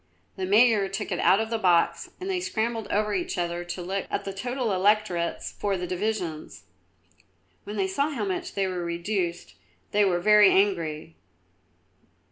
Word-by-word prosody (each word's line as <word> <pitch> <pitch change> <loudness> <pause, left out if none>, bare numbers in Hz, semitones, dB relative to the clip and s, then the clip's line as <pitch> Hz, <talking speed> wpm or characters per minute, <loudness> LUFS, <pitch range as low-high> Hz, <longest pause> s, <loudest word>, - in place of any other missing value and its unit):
The 190 -1 -3
Mayor 210 -1 +4
took 200 +2 -4
it 175 - -1
out 195 - +4
of 225 +1 -3
the 230 - 0
box 170 -3 +2
and 370 - -6
they 380 -2 0
scrambled 225 - -2
over 210 0 0
each 185 -2 -2
other 175 0 -2
to 175 +1 -5
look 195 +2 -3
at - - -2
the 195 - -4
total 245 +3 -2
electorates 185 -3 +1
for 200 -2 -2
the 180 - -4
divisions. 180 - -4 1.0
When 205 - -6
they 195 -2 +1
saw 280 +10 0
how 240 -9 -3
much 190 -2 -4
they 195 - +1
were 180 -2 -3
reduced 170 +1 -3 0.4
they 210 0 +3
were 180 -3 +2
very 210 +2 +6
angry. 165 -6 0
195 Hz, 170 wpm, -26 LUFS, 175-215 Hz, 1.0 s, very